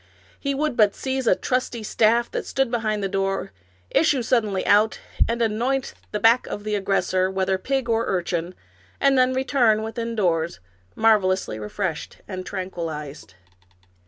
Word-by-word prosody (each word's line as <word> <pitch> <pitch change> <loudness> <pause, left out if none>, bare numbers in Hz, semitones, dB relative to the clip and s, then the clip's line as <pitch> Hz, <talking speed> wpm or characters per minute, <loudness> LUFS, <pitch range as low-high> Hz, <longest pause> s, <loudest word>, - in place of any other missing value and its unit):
He 280 -1 -2
would 300 -1 -1
but 210 -3 +4
seize 265 -2 -2
a - - +5
trusty 250 -2 -2
staff 230 +3 +2
that - - -4
stood 270 -3 0
behind 215 -3 -1
the - - +1
door, 195 - -2 0.4
issue 290 -6 +3
suddenly 215 -5 +1
out, 210 +2 +3 0.3
and 235 +1 -1
anoint 245 +5 -1 0.2
the 210 - -2
back 230 +3 +4
of 205 - -5
the 215 0 -3
aggressor, 190 -2 +1
whether 190 0 0
pig 270 +3 -1
or 230 0 +1
urchin, 175 -1 -2 0.4
and 275 0 +4
then 255 0 +4
return 250 -5 +2
within 230 +1 -4
doors, 170 - 0 0.4
marvelously 190 - +2
refreshed 160 - -4
and 185 -1 -6
tranquilized. 165 - -6
215 Hz, 150 wpm, -23 LUFS, 185-240 Hz, 0.4 s, a